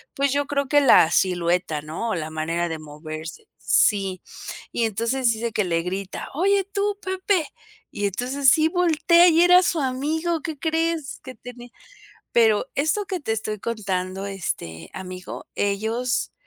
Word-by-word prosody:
pues 280 -1 +1
yo 285 0 +1
creo 280 -1 -1
que 290 +1 +4
la 235 - +6
silueta, 175 -3 +1
¿no?, 160 +10 -4
o 220 - 0
la 155 -2 -4
manera 165 +2 -2
de 160 - -4
moverse 155 - -9
sí, 195 -3 +2 0.5
y 235 - 0
entonces 230 +3 0
dice 225 0 -3
que 210 - +1
le 170 -2 0
grita: 190 +3 -5
"Oye, 390 +5 +2
tú, 400 +1 -2
Pepe", 375 -3 0 0.4
y 205 - -3
entonces 255 +7 +1
sí 315 +4 +4
voltea 340 0 +4
y 330 +1 +4
era 360 +1 +7
su 345 -2 0
amigo, 310 +5 -1
¿qué 315 0 -5
crees?, 325 -2 -1
que 260 -1 -9
tenía 245 0 -11 0.6
pero 225 +1 +3
esto 315 +9 0
que 370 -2 -3
te 225 - -2
estoy 215 -1 -3
contando, 195 -4 -3
este, 85 - -5
amigo, 185 -1 -8
ellos, 220 +5 -1
235 Hz, 155 wpm, -23 LUFS, -, 0.6 s, era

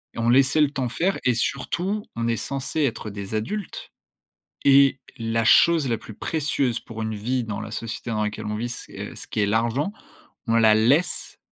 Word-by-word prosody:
on 115 0 0
laissait 135 +4 +4
le 145 - +4
temps 130 -4 -2
faire 180 +11 0
et 125 - +3
surtout, 180 - -1
on 115 0 -1
est 115 -1 +1
censé 140 +7 -3
être 115 -5 -1
des 100 +1 -6
adultes 200 - -4 0.7
et 140 -1 +6 0.2
la 115 0 0
chose 160 +4 +5
la 115 - +1
plus 110 - -11
précieuse 140 -3 -1
pour 115 -1 -8
une 110 0 -2
vie 120 +4 -1
dans 110 -2 -4
la 110 - -7
société 115 +1 -5
dans 105 -1 0
laquelle 105 +1 -4
on 105 0 -2
vit, 120 +3 -3
c'est, 120 - -7
heu, - - -12
ce - - -9
qui 105 - -2
est - - +3
l'argent, 115 - 0 0.6
on 115 - +2
la 110 -1 +6
laisse 135 +11 +1
115 Hz, 200 wpm, -24 LUFS, 110-140 Hz, 0.7 s, et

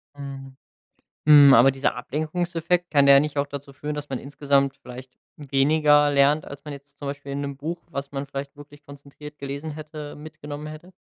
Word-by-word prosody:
Mhm. 135 -1 -9 0.7
Hm, 145 -2 +9
aber 120 +4 +7
dieser 135 +1 -1
Ablenkungseffekt 170 +5 -2
kann 140 -2 +4
der 140 0 +8
nicht 150 0 -3
auch 140 0 +1
dazu 140 -1 -8
führen, 150 +2 -5
dass 150 0 -6
man 130 - -3
insgesamt 140 0 0
vielleicht 125 +1 -11 0.2
weniger 145 +1 +3
lernt, 145 +2 +3
als 140 0 -10
man 150 - -7
jetzt 140 0 -13
zum 145 - -7
Beispiel 140 0 -6
in 140 +1 -3
‘nem 140 -1 -5
Buch, 170 +4 -5
was 140 -2 -6
man 140 0 -4
vielleicht 140 +1 -7
wirklich 145 0 -15
konzentriert 145 +1 -13
gelesen 140 +3 -6
hätte, 150 -1 -8
mitgenommen 150 -1 -9
hätte? 155 +4 -11
145 Hz, 185 wpm, -24 LUFS, 140-150 Hz, 0.7 s, Hm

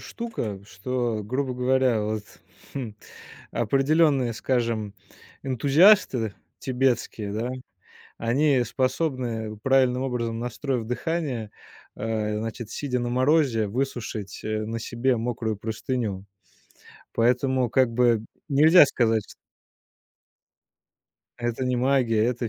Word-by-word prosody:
штука, 165 - -5
что, 115 +2 -2
грубо 130 +3 -2
говоря, 125 -2 +2
вот, 105 0 -2 0.5
хм, 125 -6 -4 0.6
определённые, 135 +1 +2
скажем, 115 -4 -1 0.5
энтузиасты 135 - +4 0.3
тибетские, 125 -5 -1
да, 115 +4 -2 0.7
они 130 +3 +2
способны, 125 -4 -2
правильным 130 -1 +3
образом 115 -3 -2
настроив 120 +1 -3
дыхание, 125 -4 -3 0.4
э, 105 -1 -2
значит, 115 0 -5
сидя 125 -2 -2
на 120 0 -2
морозе, 130 -4 +2
высушить, 110 -4 -4
э, 110 0 -2
на 115 +1 -4
себе 120 +2 0
мокрую 115 -2 -2
простыню. 110 -2 -3 0.9
Поэтому, 125 +2 +2
как 130 0 +3
бы, 120 -2 +3 0.3
нельзя 155 +4 +7
сказать 115 -5 0 2.0
Это 120 +1 -2
не 125 -1 0
магия, 125 -4 +2
это 120 -1 -1
120 Hz, 100 wpm, -25 LUFS, 110-130 Hz, 2.0 s, нельзя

